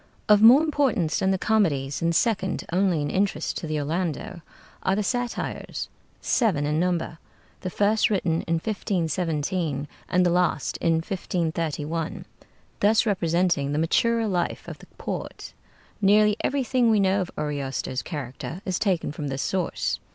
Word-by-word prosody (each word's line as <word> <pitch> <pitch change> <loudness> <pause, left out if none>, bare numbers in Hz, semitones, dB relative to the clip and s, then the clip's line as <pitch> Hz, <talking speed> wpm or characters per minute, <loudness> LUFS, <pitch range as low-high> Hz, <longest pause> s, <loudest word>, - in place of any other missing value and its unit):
Of 210 -1 +6
more 250 +7 +8
importance 275 - +1
than 190 - +1
the 190 - +2
comedies, 155 -11 +1
and 165 0 +1
second 195 -3 0
only 180 -5 +2
in 145 - -2
interest 190 -5 0
to 165 - -5
the 155 0 -1
'Orlando' 165 +3 -3 0.4
are 190 - +1
the 210 - 0
'Satires' 245 +2 -3 0.3
seven 185 - +1
in 150 +1 0
number, 170 -2 -1 0.4
the 185 - -4
first 210 +4 +2
written 180 -5 0
in 165 - +1
1517 165 -5 -1 0.2
and 180 0 +3
the 175 - +3
last 175 -5 +1
in 165 - +1
1531, 165 -2 -2 0.5
thus 215 +3 +4
representing 170 -7 +1
the - - 0
maturer 230 +8 +2
life 180 -5 -2
of - - -8
the - - -15
poet. - - -6 0.5
Nearly 210 +1 +5
everything 255 -3 +1
we 215 -2 +4
know 195 0 +2
of 180 - -3
Ariosto's 140 -3 -3
character 145 +2 -6
is 185 -1 -1
taken 185 -8 0
from 150 -1 -5
this 135 0 -2
source. 185 -3 -1
180 Hz, 150 wpm, -25 LUFS, 155-205 Hz, 0.5 s, more